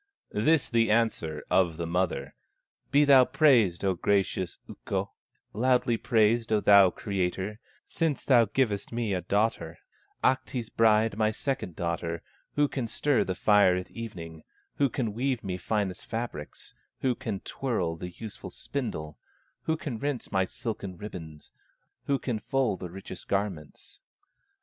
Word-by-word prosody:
This 145 +8 +3
the 115 -1 +2
answer 105 -9 +1
of 85 -4 +3
the 85 - -3
mother: 85 -5 -1 0.6
"Be 145 +1 +5
thou 135 -2 +8
praised, 125 - +3
O 95 - +3
gracious 95 -1 0
Ukko, - - -4 0.4
Loudly 125 +1 +2
praised, 115 0 +2
O 110 - +4
thou 100 -2 +7
Creator, 95 +2 -3 0.3
Since 160 -4 -1
thou 120 -4 +6
givest 105 -2 -1
me 115 -3 -1
a 90 - -1
daughter, 100 -6 0 0.5
Ahti's 130 -2 0
bride, 110 -1 +3
my 110 -1 +3
second 110 - -3
daughter, 85 -1 -3 0.3
Who 145 0 +3
can 130 -4 -3
stir 145 +3 +1
the 95 - -3
fire 105 -2 +5
at 90 0 -5
evening, 85 -9 -8 0.4
Who 140 -1 +3
can 115 -3 -2
weave 125 +1 -1
me 95 -2 -3
finest 95 0 -2
fabrics, 115 -10 -6 0.3
Who 130 -2 +2
can 115 -6 -5
twirl 100 -11 -2
the 90 +2 -6
useful 105 +3 -9
spindle, 80 - -5 0.5
Who 160 0 +1
can 125 -8 -5
rinse 140 -2 -3
my 95 -1 +2
silken 100 -3 -5
ribbons, 80 -6 -9 0.5
Who 140 - +2
can 125 -4 -3
full 125 -2 0
the 90 -1 -7
richest 95 +3 -9
garments. 100 -7 -4
105 Hz, 145 wpm, -28 LUFS, 90-125 Hz, 0.6 s, thou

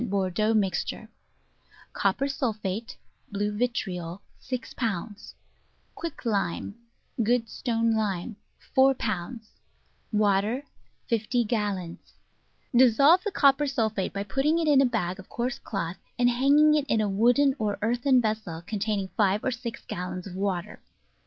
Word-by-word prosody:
Bordeaux 200 +3 +1
Mixture 195 -3 -1 0.8
Copper 275 - +1
Sulphate 220 -6 -3 0.3
(blue 205 +1 -1
vitriol) 195 -6 -3 0.2
6 255 -1 -5
pounds 205 -2 -4 0.6
Quicklime 220 - -2 0.5
(good 230 +1 +2
stone 230 0 0
lime) 210 -1 -2 0.4
4 265 0 +5
pounds 215 +1 -4 0.6
Water 210 +4 +1 0.4
50 235 +2 +1
gallons 205 -6 -3 0.6
Dissolve 270 +8 +6
the 420 - -1
copper 285 -3 +4
sulphate 220 -7 -1
by 200 - -3
putting 270 +10 +1
it 330 -2 0
in 285 -2 +6
a - - +5
bag 190 -6 -2
of 190 - -12
coarse 240 +1 -3
cloth, 185 -3 -4 0.2
and 245 0 +4
hanging 285 +5 +5
it 300 -2 +2
in 225 - +2
a 215 - +1
wooden 245 +7 +3
or 210 -2 -1
earthen 245 +3 +3
vessel 215 -8 -2
containing 205 -2 -2
five 205 -1 +1
or 260 - 0
six 240 -1 -6
gallons 180 0 -5
of 190 - -8
water. 190 -3 -3
220 Hz, 130 wpm, -27 LUFS, 200-250 Hz, 0.8 s, Dissolve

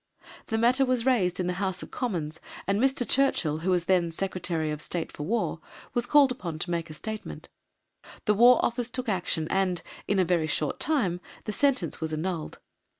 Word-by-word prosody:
The 225 - -1
matter 245 +4 +4
was 255 -2 +1
raised 195 -10 +2
in 180 - 0
the 180 - 0
House 190 -1 -2
of - - -11
Commons, 170 -11 -3 0.3
and 200 +3 +1
Mr. 265 -2 +2
Churchill, 175 - +2
who 175 +4 -2
was 180 -2 +2
then 175 -2 +3
Secretary 170 -3 -2
of 150 0 -2
State 170 0 -3
for - - -9
War, 225 +10 -1 0.3
was 240 -1 0
called 285 -2 +6
upon 175 -10 -5
to 175 +2 -4
make 170 -1 -2
a 155 - -7
statement. 220 +6 -6 0.8
The 210 - +4
War 240 +3 +7
Office 240 0 -1
took 255 +1 -4
action 175 -5 0
and, 185 -3 +1 0.2
in 205 - +1
a 185 - +4
very 170 -2 +1
short 150 -1 0
time, 205 - 0 0.2
the 215 - -3
sentence 255 - +1
was 160 0 -2
annulled. 165 0 -3
190 Hz, 195 wpm, -27 LUFS, 170-240 Hz, 0.8 s, War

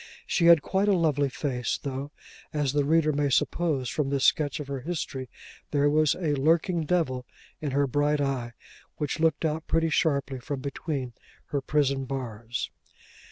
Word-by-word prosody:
She 170 - +2
had 170 -4 +7
quite 195 +1 +1
a 200 -2 +4
lovely 145 -4 +2
face, 130 -3 -2
though, 140 +1 -5 0.4
as 145 -3 0
the 145 -1 +2
reader 155 0 +3
may 145 0 +1
suppose 140 -1 +1
from 140 +2 -1
this 140 -1 +1
sketch 150 -1 +2
of 145 - -6
her 140 -1 -3
history, 135 -4 -4 0.4
there 145 0 +2
was 155 -1 +3
a 160 -5 -1
lurking 160 +4 +2
devil 130 -8 +1 0.4
in 150 - -2
her 140 +1 +2
bright 145 +2 +1
eye, 130 -4 -1 0.4
which 150 +2 -2
looked 160 0 +2
out 160 0 -2
pretty 165 0 +1
sharply 140 -4 +1
from 140 +2 -4
between 135 -2 -4 0.4
her 140 - -1
prison 140 -1 +1
bars. 120 -3 -4
145 Hz, 165 wpm, -27 LUFS, 135-155 Hz, 0.4 s, had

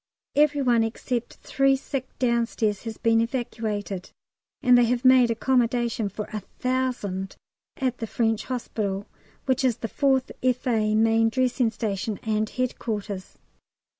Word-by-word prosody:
Every 290 -1 +3
one 240 -3 +4
except 235 +1 -3
three 275 0 +3
sick 265 -1 -4
downstairs 235 -4 0
has 225 -1 -5
been 225 0 +3
evacuated, 220 -6 -3 0.5
and 250 -1 +6
they 245 -1 +6
have 245 +2 -1
made 255 -2 +7
accommodation 235 -2 +1
for 210 +2 -5
1000 215 -3 -2 0.4
at 255 -2 -1
the 225 - -3
French 225 -1 0
Hospital, 205 -5 -3 0.4
which 260 -1 +1
is 245 -3 +2
the 225 - -4
4th 265 +2 +1
F.A. 240 -4 +1
main 225 +1 +4
dressing 250 0 +1
station, 210 -2 -3
and 215 -1 0
headquarters. 210 -6 -4
235 Hz, 130 wpm, -25 LUFS, 215-255 Hz, 0.5 s, made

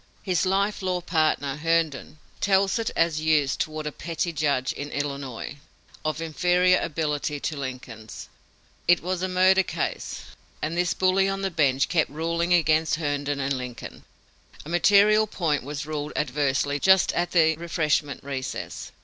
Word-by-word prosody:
His 185 -1 +1
life 200 +2 0
law 185 -1 -1
partner, 155 -5 0
Herndon, 160 -2 -1 0.2
tells 195 +1 +2
it 225 - -1
as 165 -2 +1
used 155 -3 +2
toward 155 0 -3
a 150 - -2
petty 170 +3 -3
judge, 145 -4 0
in 145 +1 -6
Illinois, 140 -2 -5 0.5
of 155 0 -2
inferior 180 +3 +3
ability 150 -2 -2
to 155 - -2
Lincoln's. 125 -5 -7 0.6
It 175 -1 +4
was 180 0 -2
a 185 - 0
murder 185 +1 +4
case, - - -4 0.4
and 155 +2 -3
this 175 0 0
bully 190 +1 +2
on 195 0 -3
the 195 - -1
bench 140 -5 +2
kept 165 -3 +1
ruling 170 +3 -2
against 160 -2 +3
Herndon 145 -2 -2
and 135 0 0
Lincoln. 125 -2 -8 0.6
A - - -8
material 205 +5 +5
point 160 -8 -1
was 145 +2 -5
ruled 150 -1 -4
adversely 145 0 0
just 190 +4 +4
at 175 0 0
the 160 -3 +3
refreshment 160 -4 -1
recess. 135 -2 -5
160 Hz, 150 wpm, -25 LUFS, 145-180 Hz, 0.6 s, material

